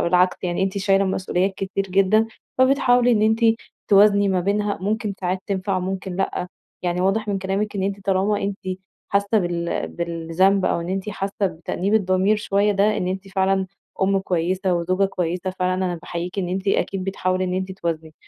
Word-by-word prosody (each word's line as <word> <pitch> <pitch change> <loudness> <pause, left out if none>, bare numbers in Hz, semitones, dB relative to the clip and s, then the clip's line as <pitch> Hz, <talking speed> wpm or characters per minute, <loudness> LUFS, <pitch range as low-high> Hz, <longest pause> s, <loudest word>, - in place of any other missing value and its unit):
بالعكس 180 +1 +3
يعني 175 +1 -1
أنتِ 195 +1 -1
شايلة 195 0 +3
مسؤوليات 190 0 0
كتير 195 +1 -2
جدًا، 195 +4 +3 0.3
فبتحاولي 245 -2 +4
إن 215 - +2
أنت 220 +2 +2 0.5
توازني 200 0 +5
ما 185 -1 +1
بينها. 205 +2 0
ممكن 210 +1 -1
ساعات 185 0 -1
تنفع، 190 -1 -1
ممكن 190 0 -4
لأ. 185 -1 -2 0.3
يعني 175 0 -1
واضح 195 +3 +1
من 200 - 0
كلامِك 195 +2 -2
إن 190 - -1
أنتِ 195 0 -3
طالما 195 +2 +1
أنتِ 195 0 -4 0.4
حاسّة 200 +2 +2
بال 175 -2 -2
بالذنب، 170 +3 +1
أو - - +1
إن 170 - -5
أنتِ 190 +2 -3
حاسّة 195 0 -4
بتأنيب 180 +4 -2
الضمير 190 0 +3
شويّة، 205 0 +1
ده 205 +2 +2
إن 180 - -1
أنتِ 190 +1 -4
فعلًا 190 0 +1 0.4
أم 195 0 +3
كويّسة 185 0 0
وزوجة 185 +3 +1
كويّسة 180 -1 -2
فعلًا. 185 0 -1
أنا 185 -1 -1
باحييكِ 175 +2 -5
إن 180 -2 -1
أنتِ 190 +2 -2
أكيد 195 -1 0
بتحاولي 185 -1 -1
إن 180 0 -2
أنتِ 190 0 -2
توازني. 165 -4 -4
190 Hz, 175 wpm, -22 LUFS, 180-200 Hz, 0.5 s, توازني